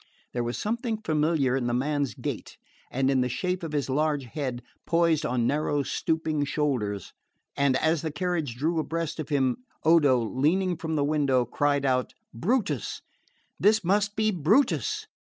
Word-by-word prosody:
There 120 Hz, -, -1 dB
was 120 Hz, +1 st, -3 dB
something 225 Hz, 0 st, -2 dB
familiar 155 Hz, -7 st, +1 dB
in 125 Hz, -2 st, -1 dB
the 120 Hz, -, 0 dB
man's 145 Hz, +1 st, 0 dB
gait, -, -, -5 dB, 0.3 s
and 135 Hz, +1 st, +1 dB
in 130 Hz, -2 st, +3 dB
the 125 Hz, -, 0 dB
shape 180 Hz, +9 st, -2 dB
of 165 Hz, -3 st, -5 dB
his 145 Hz, -2 st, 0 dB
large 145 Hz, +1 st, +1 dB
head, 125 Hz, -1 st, -4 dB, 0.2 s
poised 165 Hz, -2 st, +2 dB
on 120 Hz, -1 st, 0 dB
narrow 145 Hz, +1 st, +1 dB
stooping 155 Hz, +2 st, -1 dB
shoulders, 125 Hz, -, -1 dB, 0.4 s
and 140 Hz, -2 st, +3 dB
as 160 Hz, -1 st, +1 dB
the 160 Hz, -, -2 dB
carriage 165 Hz, -7 st, -2 dB
drew 160 Hz, +6 st, 0 dB
abreast 165 Hz, 0 st, -3 dB
of 155 Hz, -2 st, -4 dB
him, 135 Hz, -4 st, +1 dB, 0.3 s
Odo, 150 Hz, -5 st, +5 dB
leaning 155 Hz, -, +1 dB
from 160 Hz, -1 st, -3 dB
the 145 Hz, -, +2 dB
window, 140 Hz, -4 st, +2 dB
cried 145 Hz, +3 st, +1 dB
out, 130 Hz, -1 st, 0 dB, 0.2 s
"Brutus 160 Hz, -, -1 dB, 0.6 s
this 210 Hz, +1 st, +4 dB
must 205 Hz, +3 st, +1 dB
be 215 Hz, 0 st, +2 dB
Brutus!" 270 Hz, -, +2 dB
150 Hz, 160 wpm, -27 LUFS, 130-170 Hz, 0.6 s, Odo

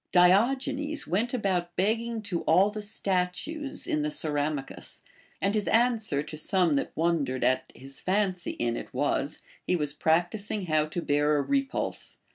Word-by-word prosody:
Diogenes 270 Hz, -, +3 dB
went 220 Hz, +7 st, 0 dB
about 185 Hz, -7 st, -1 dB
begging 225 Hz, +3 st, 0 dB
to 190 Hz, -5 st, -2 dB
all 185 Hz, +6 st, +4 dB
the 215 Hz, 0 st, -5 dB
statues 205 Hz, -, -1 dB
in 310 Hz, -3 st, 0 dB
the 300 Hz, -, 0 dB
Ceramicus; 150 Hz, -, -1 dB, 0.4 s
and 200 Hz, +1 st, +1 dB
his 210 Hz, -2 st, 0 dB
answer 225 Hz, -, +2 dB
to 150 Hz, +1 st, -8 dB
some 180 Hz, 0 st, +2 dB
that 140 Hz, -, 0 dB
wondered 155 Hz, -6 st, 0 dB
at 130 Hz, -, +1 dB
his 135 Hz, +1 st, -9 dB
fancy 185 Hz, -2 st, 0 dB
in 120 Hz, -1 st, -1 dB
it -, -, -7 dB
was, -, -, -1 dB, 0.2 s
he -, -, +3 dB
was 150 Hz, -4 st, -2 dB
practising 175 Hz, +7 st, 0 dB
how 155 Hz, -2 st, +2 dB
to 170 Hz, +2 st, -4 dB
beai 145 Hz, 0 st, +1 dB, 0.2 s
a -, -, +2 dB
repulse. 275 Hz, -, -2 dB
185 Hz, 155 wpm, -28 LUFS, 155-225 Hz, 0.4 s, all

